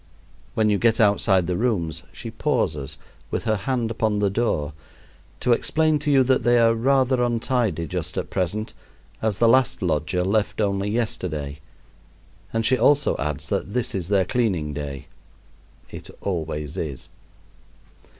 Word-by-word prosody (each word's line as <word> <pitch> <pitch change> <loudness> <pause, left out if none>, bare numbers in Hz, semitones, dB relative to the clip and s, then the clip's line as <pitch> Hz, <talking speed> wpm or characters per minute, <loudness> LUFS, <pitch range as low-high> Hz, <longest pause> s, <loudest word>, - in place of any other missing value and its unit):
When 110 -1 +3
you 100 - +2
get 115 -1 +3
outside 100 -3 +3
the 90 +1 -1
rooms 90 - -1
she - - -7
pauses, 70 -2 -1 0.3
with - - -2
her 110 -2 +1
hand 115 +2 -1
upon 110 -2 0
the 100 -1 +1
door, 80 -9 0 0.7
to 125 - +2
explain 155 +5 +2
to 150 +1 -2
you 135 -2 +5
that 130 0 +2
they 120 +1 +4
are 115 -1 +5
rather 130 +1 +2
untidy 120 -7 0
just 80 -4 -4
at - - -3
present, 100 +4 -2 0.5
as 110 -3 0
the 115 - +4
last 125 -3 +3
lodger 85 +2 0
left 105 +3 0
only 100 -1 0
yesterday; 80 -10 -3 0.9
and 115 0 -1
she 130 +2 +3
also 145 0 +4
adds 75 0 -3
that 100 - -2
this 125 -3 -1
is 90 -3 -3
their 100 -2 +2
cleaning 90 -11 0
day 70 -1 -5 0.9
it - - -9
always 80 -6 -3
is. 70 -5 -5
105 Hz, 150 wpm, -23 LUFS, 85-120 Hz, 0.9 s, you